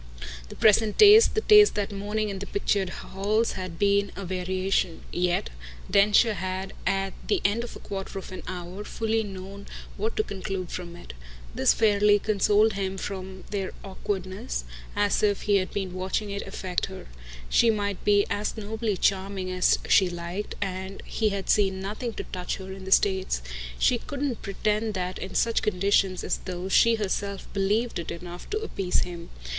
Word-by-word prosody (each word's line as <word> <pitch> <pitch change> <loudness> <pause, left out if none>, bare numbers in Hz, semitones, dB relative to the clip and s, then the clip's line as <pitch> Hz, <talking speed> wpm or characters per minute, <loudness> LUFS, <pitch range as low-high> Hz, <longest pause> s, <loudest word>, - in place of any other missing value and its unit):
The - - -9
present 215 0 +4
taste, 425 +2 +8
the 435 - +2
taste 420 -1 +7
that 205 0 -1
morning 210 +2 -2
in 195 -1 -4
the 200 - -6
pictured 200 -1 0
halls, 210 +5 -1
had 185 -3 -6
been 200 +1 +2
a 200 - -6
variation; 185 -1 -1
yet 175 - 0 0.4
Densher 210 +3 +5
had 190 0 -4
at 195 0 0
the 410 - +2
end 220 +4 +2
of 240 - -8
a - - -9
quarter 195 -1 -6
of 190 - -7
an 185 - -7
hour 180 +2 -6
fully 225 +1 -1
known 195 0 -8 0.3
what 220 +3 -2
to 215 - +3
conclude 190 -3 -5
from 175 -1 -6
it. 175 - -11 0.4
This 130 - +3
fairly 205 -1 +4
consoled 210 +1 +3
him 195 -1 -3
for 190 -1 -4 0.3
their 195 -2 -2
awkwardness, 190 - -4 0.3
as 205 0 +2
if 205 -2 +1
he 205 -1 +3
had 185 -1 -1
been 190 -3 -3
watching 190 +3 -2
it 200 0 -4
affect 185 -2 -2
her. 190 -1 -9 0.4
She 230 - +4
might 205 -3 -1
be 205 -1 +4
as 210 +2 -2
nobly 220 -1 -2
charming 190 -1 0
as 185 0 +3
she 190 -2 +5
liked, 175 +4 -5
and 190 0 -5
he 220 -2 0
had 200 -1 -4
seen 195 -2 +2
nothing 215 +5 -4
to - - -5
touch 180 -1 -4
her 190 0 -8
in 190 0 -9
the 190 - -6
States; 190 - +2 0.3
she 240 - +3
couldn't 280 -3 -3
pretend 210 +2 -1
that 185 0 -3
in 190 - -7
such 230 -1 +2
conditions 195 -1 +1
as - - -1
those 185 +1 -5
she 230 0 +6
herself 200 -1 -3
BELIEVED 205 +4 0
it 170 - -5
enough 175 +1 -8
to 425 - -1
appease 195 - -1
him. 170 -1 -6
195 Hz, 175 wpm, -26 LUFS, 185-210 Hz, 0.4 s, taste